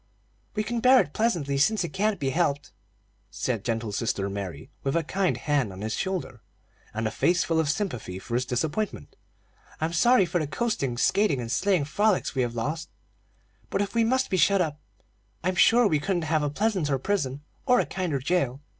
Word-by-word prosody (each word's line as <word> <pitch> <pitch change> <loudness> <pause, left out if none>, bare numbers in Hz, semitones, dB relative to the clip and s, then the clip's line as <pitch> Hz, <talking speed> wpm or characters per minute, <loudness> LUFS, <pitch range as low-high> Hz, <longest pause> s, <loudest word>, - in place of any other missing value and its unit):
"We 215 - 0
can 235 +2 -2
bear 255 +2 +6
it 145 - -1
pleasantly, 165 -12 0
since 215 +6 +3
it 170 - -5
can't 205 0 0
be 135 -2 0
helped," 145 -2 0 0.6
said 115 +2 -2
gentle 115 -2 -2
sister 100 -2 -1
Mary, 95 -7 -6
with 135 +2 -1
a 170 - +2
kind 190 +4 0
hand 140 -8 0
on 95 +1 -9
his 110 +1 -2
shoulder, 180 - -3 0.5
and 110 +2 -3
a 110 - 0
face 175 +9 +2
full 165 -1 0
of 160 -3 +1
sympathy 150 - -3
for 105 +5 -8
his 125 +2 0
disappointment. 160 - -2 0.6
"I'm 160 +2 -1
sorry 235 +4 +5
for 175 - -1
the 155 - -2
coasting, 140 - -1
skating, 180 - +2
and 115 -2 -4
sleighing 185 -4 +2
frolics 205 +6 +1
we 135 - 0
have 120 -1 -2
lost; 155 +8 -3 0.8
but - - -1
if 200 0 -1
we 230 -1 +3
must 260 +3 +1
be 185 - +2
shut 195 +4 +4
up, 155 -4 -1 0.6
I'm 185 +1 +1
sure 235 +6 +5
we 155 -7 +2
couldn't 175 +2 -1
have 155 0 +1
a 145 - 0
pleasanter 175 -5 0
prison 145 -4 -2 0.2
or 250 -1 +5
a - - +1
kinder 180 -6 -2
jailer. 135 -2 0
160 Hz, 195 wpm, -26 LUFS, 130-200 Hz, 0.8 s, bear